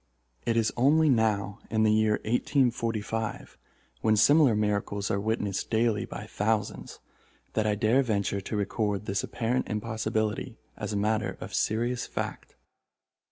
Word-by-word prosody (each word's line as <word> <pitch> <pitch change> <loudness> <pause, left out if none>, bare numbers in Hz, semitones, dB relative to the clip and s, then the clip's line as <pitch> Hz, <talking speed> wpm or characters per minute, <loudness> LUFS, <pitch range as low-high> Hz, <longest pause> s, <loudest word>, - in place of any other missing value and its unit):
It 115 0 +2
is 110 -1 +1
only 150 +5 +4
now, 105 -4 +1
in 110 -1 +2
the 110 - +4
year 110 0 +3
1845, 115 -3 -1 0.5
when 110 -1 +3
similar 145 +2 +5
miracles 105 -1 -1
are 100 - +1
witnessed 105 -2 -2
daily 110 -2 +1
by - - -7
thousands, 105 0 -2 0.5
that 110 -1 +1
I 105 - +2
dare 110 +6 +3
venture 100 -5 -1
to 105 +3 -4
record 105 0 -1
this 100 -1 -1
apparent 120 +2 -1
impossibility 110 -1 -2 0.2
as - - -5
a 105 - -1
matter 110 +2 0
of - - -8
serious 120 +3 0
fact. - - -5
110 Hz, 140 wpm, -28 LUFS, 105-115 Hz, 0.5 s, similar